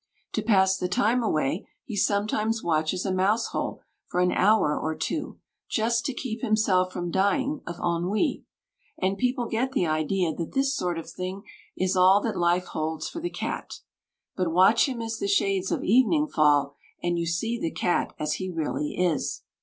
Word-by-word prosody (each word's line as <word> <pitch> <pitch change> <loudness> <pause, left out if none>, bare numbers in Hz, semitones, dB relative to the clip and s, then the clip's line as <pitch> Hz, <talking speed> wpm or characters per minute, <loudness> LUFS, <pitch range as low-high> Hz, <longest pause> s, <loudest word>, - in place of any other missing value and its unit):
To 220 - 0
pass 190 -3 +3
the 180 - -1
time 220 +7 +2
away 160 - -1 0.2
he 225 - -6
sometimes 215 +2 0
watches 160 +3 0
a 190 - 0
mouse 205 +5 +1
hole - - -3 0.3
for 180 - -2
an 180 0 +3
hour 195 -7 +3
or 160 0 -2
two 300 - -3 0.3
just 230 +2 +1
to 275 - -2
keep 230 -4 -4
himself 215 -5 +2
from 175 -1 -4
dying 265 - +1
of 170 - -4
ennui; 175 - 0 0.6
and 190 +1 +1
people 250 +2 0
get 245 +4 -1
the 185 - +2
idea 155 +2 0
that 165 +1 -5
this 275 +1 +1
sort 175 -7 -1
of 165 - -6
thing 185 +2 -6 0.3
is 185 0 +1
all 185 +2 +6
that 225 -1 -2
life 175 +1 +2
holds 160 -1 -3
for 335 - -6
the 350 - -2
cat. - - -5 0.6
But 180 -3 0
watch 195 - +5
him 240 -3 -4
as 225 0 -4
the - - -1
shades 195 -1 +1
of - - -1
evening 260 - +4
fall, 145 - +3 0.3
and 175 0 0
you 170 - -2
see 225 +8 -1
the 165 - -1
cat 175 +2 -1
as 150 0 -1
he 185 - -3
really 155 -3 -2
is. 180 -4 0
190 Hz, 185 wpm, -26 LUFS, 175-225 Hz, 0.6 s, all